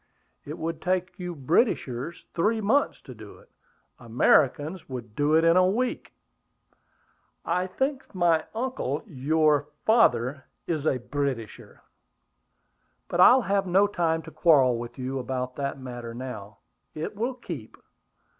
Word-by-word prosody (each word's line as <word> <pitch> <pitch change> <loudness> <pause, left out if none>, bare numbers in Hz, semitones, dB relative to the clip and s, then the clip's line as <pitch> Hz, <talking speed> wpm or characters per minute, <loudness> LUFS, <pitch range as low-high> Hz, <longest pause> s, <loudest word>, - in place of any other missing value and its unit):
"It 150 +3 -7
would 165 0 -4
take 185 0 -1
you 180 -1 -5
Britishers 145 - 0
three 215 +7 +1
months 225 +8 +1
to 130 - -11
do 110 -3 -12
it; - - -22 0.5
Americans 145 +8 +2
would 120 -4 -7
do 145 +2 +2
it 160 - +4
in 165 0 +5
a 185 0 +5
week." 245 +6 -2 1.3
"I 180 +2 0
think 265 +4 -3
my 170 -3 +3
uncle, 255 +3 -2
your 150 - +1 0.2
father, 140 - +3 0.2
is 155 -3 -2
a 130 - +2
Britisher. 125 -2 -5 1.3
But 175 - -2
I 250 +8 +8
have 195 -1 +1
no 190 +3 +4
time 165 -5 0
to 160 - -11
quarrel 140 -6 +4
with 120 +2 -8
you 130 +1 -3
about 125 0 -4
that 140 0 -3
matter 120 -3 -7
now; 110 -5 -8 0.4
it 155 +6 -5
will 240 +5 -2
keep. 165 - -8
155 Hz, 135 wpm, -26 LUFS, 130-185 Hz, 1.3 s, I